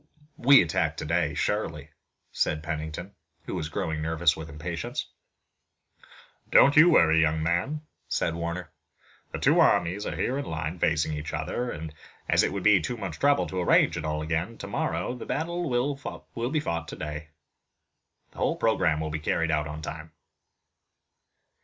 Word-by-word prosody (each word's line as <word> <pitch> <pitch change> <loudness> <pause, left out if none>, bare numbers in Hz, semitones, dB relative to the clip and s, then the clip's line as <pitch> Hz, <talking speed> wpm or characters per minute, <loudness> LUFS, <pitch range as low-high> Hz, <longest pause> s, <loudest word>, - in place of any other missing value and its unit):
"We 140 -1 +7
attack 85 - -1
today 80 -1 0
surely," 80 -5 -2 0.4
said 75 0 -1
Pennington, 80 +3 -5 0.3
who - - -5
was 75 - -3
growing 80 0 -2
nervous 80 +1 +2
with 80 0 -8
impatience. 80 +2 -4 1.4
"Don't 140 - +6
you 160 +4 +8
worry, 80 - +5
young 80 0 +1
man," 85 - 0 0.3
said 80 - 0
Warner. 85 -1 -4 0.6
"The - - -4
two - - +3
armies 90 +5 +3
are - - -3
here 130 +3 -1
in 140 - -4
line 80 +2 -4
facing 80 -1 +1
each 75 0 -5
other 125 0 -3
and 80 -5 -6 0.3
as - - +4
it - - +1
would 100 -1 -4
be 105 -3 +6
too 120 +9 -3
much 95 -7 -6
trouble 145 0 +3
to 95 - -3
arrange 90 - +4
it - - -4
all 75 0 -2
again 85 +8 -2
tomorrow - - -2
the 125 - -8
battle 170 +1 -2
will 125 -2 -3
be 155 +2 +1
fought 85 - -3
today. 75 +1 -6 1.0
The - - -13
whole - - +1
program 80 -1 +1
will 80 -1 -3
be 80 - -3
carried 80 +2 0
out 75 -2 0
on 75 +1 -7
time." 80 0 -7
80 Hz, 160 wpm, -27 LUFS, 80-105 Hz, 1.4 s, you